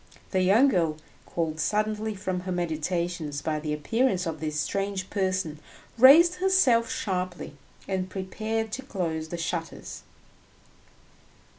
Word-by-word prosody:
The 185 - +2
young 215 +9 +5
girl, 165 - +1 0.3
called 160 -2 -2
suddenly 215 +4 0
from 190 -2 -3
her 185 +1 -5
meditations 170 -2 -2
by 155 -1 -1
the 150 0 -4
appearance 185 - 0
of 160 -2 -4
this 155 -1 -2
strange 195 +3 -2
person, 185 -6 -1 0.4
raised 305 +9 +7
herself 360 -12 +3
sharply 180 -3 -3 0.3
and 190 -1 -2
prepared 215 +4 -3
to 265 - -4
close 170 - -3
the 175 - -5
shutters. 165 0 -5
185 Hz, 125 wpm, -27 LUFS, 165-215 Hz, 0.4 s, raised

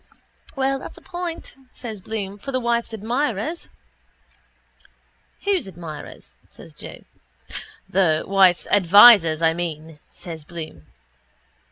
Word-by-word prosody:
—Well, 270 0 0
that's - - -10
a - - -14
point, 350 -2 -6 0.2
says 220 -5 -8
Bloom, 205 -1 -5
for 275 - -6
the 255 - 0
wife's 235 -1 -1
admirers. 235 - -2 1.7
—Whose 395 - 0
admirers? 165 -5 -10 0.2
says - - -14
Joe. - - -10 0.8
—The 170 -5 +2
wife's 190 -2 +4
advisers, 195 -4 +7
I 160 0 +4
mean, 160 -2 -5
says 165 -3 -9
Bloom. 155 - -9
195 Hz, 110 wpm, -22 LUFS, 165-240 Hz, 1.7 s, advisers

